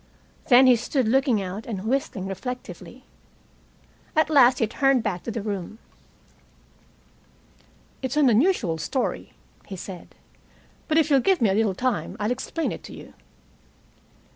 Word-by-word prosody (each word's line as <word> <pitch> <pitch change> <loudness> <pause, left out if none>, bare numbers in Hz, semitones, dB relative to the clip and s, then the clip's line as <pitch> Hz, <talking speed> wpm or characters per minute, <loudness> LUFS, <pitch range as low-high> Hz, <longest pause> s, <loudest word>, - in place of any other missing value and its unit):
Then 255 +1 +7
he 255 -1 +6
stood 245 +1 -1
looking 255 -3 +2
out 190 +4 -7
and 205 -4 -5
whistling 230 -6 -2
reflectively. 250 +7 -7 1.1
At 315 0 +2
last 255 -4 +6
he 225 - +1
turned 270 +2 +1
back 190 -5 -2
to - - -7
the 225 -2 -4
room. 205 0 -5 2.2
"It's 260 +2 -3
an 295 -3 +5
unusual 230 - +2
story," 260 - -3 0.3
he 195 - -7
said. 180 -1 -10 0.7
"But 315 - +1
if 315 -1 +2
you'll 275 - +6
give 375 +8 +2
me 220 -5 +3
a - - +1
little 210 -2 +1
time 255 +4 -2
I'll 210 +3 -1
explain 285 +6 -3
it - - -7
to - - -10
you. - - -12
240 Hz, 145 wpm, -24 LUFS, 205-270 Hz, 2.2 s, Then